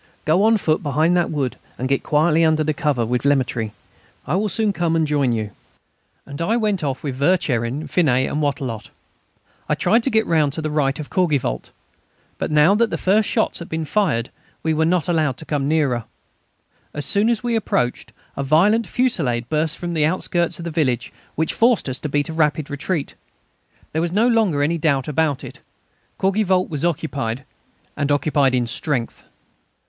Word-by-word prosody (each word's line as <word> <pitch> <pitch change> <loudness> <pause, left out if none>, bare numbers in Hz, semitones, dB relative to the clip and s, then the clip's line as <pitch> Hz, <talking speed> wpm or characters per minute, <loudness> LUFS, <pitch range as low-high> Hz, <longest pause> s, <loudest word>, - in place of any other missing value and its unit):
Go 160 +5 +3
on 225 0 +4
foot 155 -5 0
behind 155 +3 +1
that 175 -1 +1
wood, 140 -5 -2 0.2
and 130 - -2
get 135 0 +1
quietly 155 +2 +2
under 155 -1 +3
cover 140 -5 0
with 125 +2 -1
Lemaître. 130 -5 +1 0.6
I - - -1
will 210 +2 0
soon 215 -1 +1
come 170 -3 0
and 160 -1 +2
join 145 -4 +1
you." 110 -3 -2 0.7
And 140 +2 -7
I 220 +8 +1
went 210 -6 0
off 135 -2 -3
with 140 -4 -3
Vercherin, 140 -4 0
Finet, 130 -7 +2
and 150 - -2
Wattrelot. 135 -6 -3 0.8
I - - +2
tried 230 +3 +2
to 270 - 0
get 220 -2 +2
round 155 -4 +2
to 160 - -3
the 155 - -2
right 140 -2 0
of 150 - -7
Courgivault. 145 - 0 0.7
But - - -2
now 150 +4 +5
that 225 +2 +2
the - - -2
first 205 +3 +2
shots 220 - 0
had 170 - -8
been 160 0 -3
fired 150 - 0 0.3
we 160 0 +1
were 160 +1 +1
not 170 -2 +1
allowed 155 -6 +1
to 160 - -8
come 145 -3 -1
nearer. 140 -7 +1 0.9
As 145 -2 -2
soon 205 +7 +2
as 235 -2 0
we 240 -1 0
appeared 125 - -1 0.2
a - - -3
violent 185 +11 +3
fusillade 135 - 0
burst 155 0 0
from 175 -1 -4
the 155 -2 +2
outskirts 175 0 -1
of 170 - -8
the 170 - -3
village, 135 -7 -1 0.2
which 160 +1 0
forced 235 -6 +2
us 130 -1 -2
to 150 - -4
beat 145 0 0
a - - -4
rapid 150 -2 0
retreat. 150 +2 -3 0.8
There 160 - -1
was 170 0 -1
no 215 +6 +3
longer 215 -12 +2
any 165 +3 0
doubt 140 -4 +1
about 150 -2 0
it; - - -9 0.6
Courgivault 190 -1 +1
was 150 -3 -4
occupied, 140 -7 -2 0.5
and 145 0 -1
occupied 145 -2 +2
in 125 -1 +1
strength. 120 +1 -3
155 Hz, 185 wpm, -21 LUFS, 140-175 Hz, 0.9 s, now